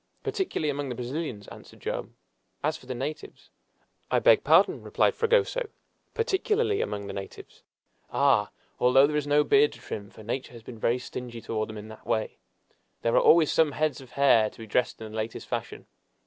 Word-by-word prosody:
"Particularly 165 - -1
among 140 -1 -4
the 125 - -4
Brazilians," 125 -3 -5
answered - - -13
Joam. - - -4 0.5
"As 155 +2 +1
for 130 - -13
the 130 - -4
natives 145 +5 -6 0.3
" - - -42
"I - - +2
beg - - +5
pardon," - - +4
replied - - +1
Fragoso, 475 0 +1 0.5
"particularly 430 -1 +1
among 100 -1 -3
the 100 - -6
natives. 95 -1 -9 0.5
Ah! - - +3 0.3
although 135 +2 +6
there 150 +1 -1
is 150 -1 -1
no 145 +1 +4
beard 425 - +4
to - - -13
trim 100 -1 -7
for 110 - -14
nature 125 +3 -4
has 115 -2 -12
been 115 -1 -10
very 120 +3 +2
stingy 125 -1 -7
toward 110 -1 -3
them 110 - -7
in 105 +1 -9
that 110 - -13
way 110 - -1 0.6
there 115 - +1
are - - +6
always 160 -2 +5
some 155 -3 +3
heads 155 -1 -1
of 130 - -15
hair 120 -6 +4
to - - -20
be 115 - -8
dressed 110 +3 0
in 110 -1 -8
the - - -9
latest 110 +1 -4
fashion. - - -5
130 Hz, 195 wpm, -27 LUFS, 110-155 Hz, 0.6 s, although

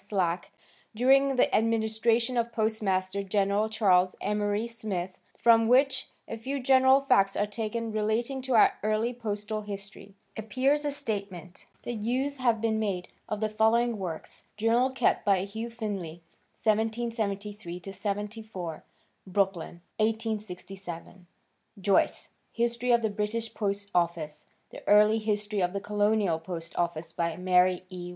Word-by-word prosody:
Slack 180 -3 -1 0.4
during 270 +3 +4
the 250 - +3
administration 225 +2 +1
of 235 -1 0
Postmaster 200 -4 0
General 200 +2 +1
Charles 185 -4 +3
Emory 210 +1 0
Smith 210 -6 -4 0.3
from 225 -1 +5
which 260 +2 +3 0.2
a 225 - -6
few 270 +5 -3
general 260 +1 +5
facts 195 -8 +3
are 205 - +1
taken 225 +2 -3
relating 220 +5 -1
to 260 0 -2
our 225 - +6
early 215 +3 0
postal 215 -2 -3
history, 200 -1 -8 0.2
appears 260 +7 +1
a 290 - 0
statement 200 - -4 0.2
that 235 -3 -4
use 260 +6 -1
had 240 -4 +2
been 220 -1 +1
made 195 -4 -2 0.2
of 210 0 -3
the 215 - +2
following 220 +1 +2
works—Journal 225 +7 -1
kept 260 - +1
by 195 -3 +3
Hugh 220 +4 -5
Finlay, 195 -8 -5 0.4
1773 215 -4 -1
74, 205 -4 -5 0.4
Brooklyn, 185 -3 -1 0.2
1867. 195 -5 -4 0.5
Joyce 195 +1 +1 0.2
"History 235 +1 -1
of 235 -1 +4
the 220 - +1
British 215 +2 -2
Post 200 -1 -2
Office; 170 -3 -1 0.2
The - - -10
Early 210 +2 +6
History 210 -1 -1
of 180 +1 0
the 200 - -1
Colonial 205 -4 +1
Post 165 0 -7
Office 170 -1 -2
by 170 -1 -2
Mary 180 0 +3
E. 180 -1 -6
215 Hz, 130 wpm, -28 LUFS, 195-230 Hz, 0.5 s, our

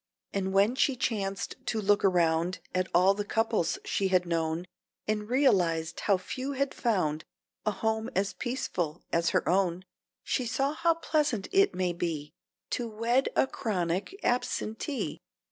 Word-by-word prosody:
And 190 -1 -1
when 200 +4 +4
she 270 0 +2
chanced 200 -6 -2
to 225 - 0
look 205 0 +3
around 175 -2 +2 0.2
At 185 0 +1
all 185 +3 +5
the 205 +1 -3
couples 225 -5 0
she 195 - +1
had 185 -1 +3
known, 165 0 -1 0.4
And 210 0 -1
realized 180 - +2
how 200 -2 +3
few 260 +9 -4
had 275 0 -1
found 160 - 0 0.4
A - - +6
home 220 +2 -1
as 195 +1 +1
peaceful 180 - -3
as 170 0 +3
her - - +1
own, 185 0 +1 0.4
She 255 - -1
saw 275 +5 0
how 335 +1 +2
pleasant 300 -10 0
it 390 +1 +4
may 180 -1 0
be 160 -3 -3 0.4
To 240 -2 -1
wed 230 +5 +1
a - - +4
chronic 200 - -2
absentee. 245 +2 -1
200 Hz, 150 wpm, -29 LUFS, 175-245 Hz, 0.4 s, A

